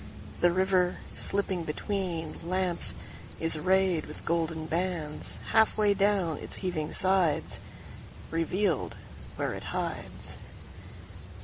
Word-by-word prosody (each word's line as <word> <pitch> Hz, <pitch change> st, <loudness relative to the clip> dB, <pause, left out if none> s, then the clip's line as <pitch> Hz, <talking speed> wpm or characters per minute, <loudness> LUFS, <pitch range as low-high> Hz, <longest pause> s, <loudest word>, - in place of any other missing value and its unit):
The 175 Hz, -, +6 dB
river, 185 Hz, 0 st, +3 dB, 0.2 s
slipping 195 Hz, -3 st, 0 dB
betweenLamps, 175 Hz, 0 st, -1 dB, 0.5 s
is 165 Hz, 0 st, +1 dB
rayed 185 Hz, 0 st, +3 dB
with 150 Hz, -, -7 dB
golden 165 Hz, -1 st, 0 dB
bandsHalf 175 Hz, +5 st, +1 dB
way 210 Hz, -1 st, +5 dB
down 195 Hz, -5 st, +2 dB
its -, -, -6 dB
heaving 155 Hz, -4 st, -1 dB
sides; 185 Hz, -5 st, +2 dB, 0.7 s
Revealed 165 Hz, 0 st, +1 dB, 0.4 s
where -, -, 0 dB
it -, -, -6 dB
hides. -, -, -3 dB
180 Hz, 95 wpm, -30 LUFS, 165-190 Hz, 0.7 s, The